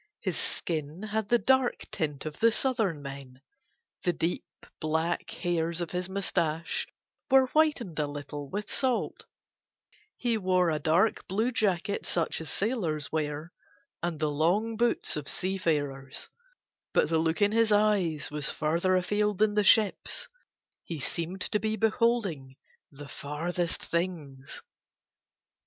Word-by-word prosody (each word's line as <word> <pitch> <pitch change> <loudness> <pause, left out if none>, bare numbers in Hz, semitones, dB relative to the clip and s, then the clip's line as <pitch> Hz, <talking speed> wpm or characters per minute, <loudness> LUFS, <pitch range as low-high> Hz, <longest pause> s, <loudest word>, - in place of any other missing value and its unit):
His - - -2
skin 160 +2 -3
had 215 -1 -2
the 240 - +6
dark 260 0 +2
tint 145 -3 -2
of 155 -1 -6
the 230 0 +5
southern 220 - 0
men: 135 -2 -8 0.6
the 175 - +2
deep 165 +2 -3
black 160 +2 0
hairs 170 -1 -1
of 170 -2 -3
his 180 +1 -2
moustache 170 -4 -1 0.4
were 265 0 +7
whitened 285 - +2
a 150 - +1
little 145 0 -6
with 205 +5 -3
salt; 255 0 -1 0.9
he 235 -3 0
wore 185 -3 +3
a 155 - 0
dark 170 +8 +2
blue 220 +6 +1
jacket 200 -4 0
such 165 -1 0
as 160 - -7
sailors 175 - -1
wear, 155 +1 -2 0.5
and 170 -3 -2
the 155 -1 +1
long 185 +10 +1
boots 235 -7 +1
of 145 -2 -5
seafarers, 145 -8 -2 0.7
but - - +4
the 165 -1 +3
look 160 +2 +1
in 205 -1 +4
his 225 0 +3
eyes 200 -9 +2
was 150 -2 -1
further 170 +4 +1
afield 205 +2 +1
than 210 +1 +3
the 210 0 +3
ships, 210 +1 +3 0.6
he 165 -3 -5
seemed 170 +7 -3
to 210 - 0
be 220 +1 0
beholding 215 - +1 0.4
the 145 0 -10
farthest 165 +5 -3
things. 155 -6 -3
175 Hz, 140 wpm, -29 LUFS, 155-210 Hz, 0.9 s, were